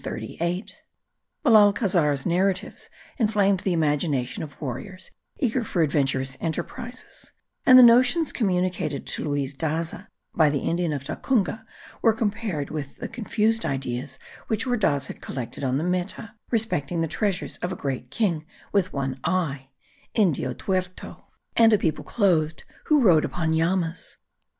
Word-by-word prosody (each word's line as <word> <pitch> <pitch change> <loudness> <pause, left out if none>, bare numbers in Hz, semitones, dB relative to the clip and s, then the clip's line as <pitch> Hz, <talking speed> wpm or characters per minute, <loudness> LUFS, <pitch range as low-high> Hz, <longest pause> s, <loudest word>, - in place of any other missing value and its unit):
Belalcazar's 200 - +4
narratives 185 +2 -1 0.3
inflamed 205 -4 +3
the 190 - -1
imagination 145 -5 0
of 145 -3 -8
warriors 155 +8 -6 0.3
eager 250 -1 0
for 180 -6 0
adventurous 135 -3 0
enterprises; 245 +9 -6 0.4
and 255 - +10
the 255 - +10
notions 250 +7 +5
communicated 180 - -1
to - - -3
Luis 145 -2 -2
Daza 165 +6 -3 0.3
by 155 -3 +4
the 145 -1 -1
Indian 170 -1 0
of 140 -2 -3
Tacunga 220 - -1 0.3
were 225 - +5
compared 210 -9 -2
with 145 -3 -5
the - - -6
confused 225 0 0
ideas 130 0 -3 0.3
which 220 +2 -1
Ordaz 200 - +1
had - - -9
collected 130 +1 -6
on 130 0 +1
the 150 - -1
Meta 180 +5 -3 0.2
respecting 180 - 0
the 165 - 0
treasures 185 +3 -2
of 180 - -3
a - - -3
great 130 -3 -4
king 170 - -1 0.2
with 195 -2 +1
one 135 -1 -3
eye 140 -8 -1 0.5
(Indio 160 - +2
tuerto), 185 -1 -4 0.3
and 225 -1 +6
a - - +6
people 160 -5 -1
clothed, 165 -8 +1 0.2
who 300 -2 +4
rode 170 -9 +5
upon 160 -2 -1
llamas. 165 +1 -1
175 Hz, 135 wpm, -25 LUFS, 145-215 Hz, 0.5 s, and